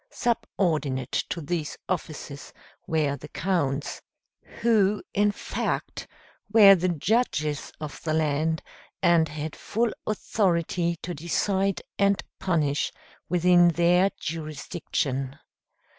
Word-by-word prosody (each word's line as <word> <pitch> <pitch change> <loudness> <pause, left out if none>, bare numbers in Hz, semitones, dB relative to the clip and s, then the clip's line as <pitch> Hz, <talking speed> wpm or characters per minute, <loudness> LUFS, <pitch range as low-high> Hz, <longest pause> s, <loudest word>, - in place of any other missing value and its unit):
Subordinate 160 - -1 0.2
to 170 - -3
these 155 0 -3
officers 155 -5 -5 0.3
were 150 -3 +1
the 135 - -10
Counts, 150 -6 -1 0.6
who, 210 -3 +3
in 205 +1 +3
fact, - - -3 0.4
were 205 -3 +9
the 185 -1 +1
judges 160 - 0
of 150 -2 -7
the 155 -1 -1
land, 160 +1 0 0.4
and 165 -2 +4
had 150 0 -5
full 230 +1 -1
authority 175 -5 0
to 175 - -3
decide 190 +4 0 0.2
and 200 0 +3 0.2
punish 150 -6 0 0.4
within 175 0 +5
their 175 +3 +4
jurisdiction. 150 -4 -3
170 Hz, 100 wpm, -26 LUFS, 150-195 Hz, 0.6 s, were